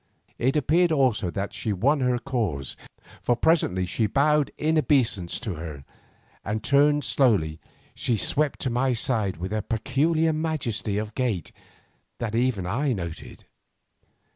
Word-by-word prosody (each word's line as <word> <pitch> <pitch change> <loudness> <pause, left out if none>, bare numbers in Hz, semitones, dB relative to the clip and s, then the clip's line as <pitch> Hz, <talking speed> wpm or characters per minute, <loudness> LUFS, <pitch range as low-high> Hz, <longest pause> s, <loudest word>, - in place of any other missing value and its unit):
It 130 +4 +1
appeared 165 +4 +3
also 130 - +2
that 100 +3 -4
she 110 - -2
won 135 +10 +2
her 125 -1 +1
cause, 105 - -3 0.5
for 120 - +2
presently 120 - +2
they 105 +4 0
bowed 150 +5 +2
in 160 +1 +1
obeisance 120 - +1
to 110 -6 -3
her, 75 -4 -7 0.6
and 110 +2 -3
turning 145 +3 +3
slowly 90 - +2 0.3
she 120 - 0
swept 145 +7 0
to 130 - -1
my 125 +2 +1
side 110 - 0
with 90 +4 -5
a 110 - 0
peculiar 155 +9 +1
majesty 140 -10 -2
of 105 0 -3
gait 115 - -2 0.7
that 115 -2 -4
even 115 -4 +1
then 90 +2 -3
I 135 +2 +1
noted. 85 -6 -7
120 Hz, 145 wpm, -25 LUFS, 100-140 Hz, 0.7 s, appeared